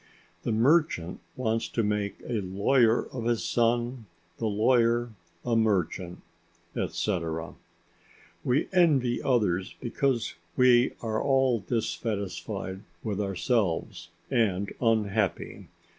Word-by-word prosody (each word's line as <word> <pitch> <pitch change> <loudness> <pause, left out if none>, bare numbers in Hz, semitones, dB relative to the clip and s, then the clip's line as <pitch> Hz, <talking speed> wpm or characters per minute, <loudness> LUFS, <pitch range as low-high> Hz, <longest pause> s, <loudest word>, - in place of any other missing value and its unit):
The - - -2
merchant 115 - +2 0.2
wants 115 -2 -1
to 115 - -1
make 105 -1 -1
a 115 -4 -1
lawyer 110 +5 +2
of 120 -3 -4
his 120 -1 +1
son, 120 0 0 0.3
the 115 - 0
lawyer 115 +2 +2 0.3
a 120 -1 +1
merchant, 95 -5 0 0.5
etc. 80 -5 -2 0.9
We 125 +4 +1
envy 140 -9 +3
others 105 -7 +1
because 125 -1 -1 0.2
we 125 -1 +5
are 110 -1 -1
all 135 -3 +3
dissatisfied 100 -3 -3 0.2
with 105 -2 -2
ourselves 95 -3 -1 0.2
and 100 -6 +1
unhappy. 110 -4 0
115 Hz, 100 wpm, -28 LUFS, 100-120 Hz, 0.9 s, we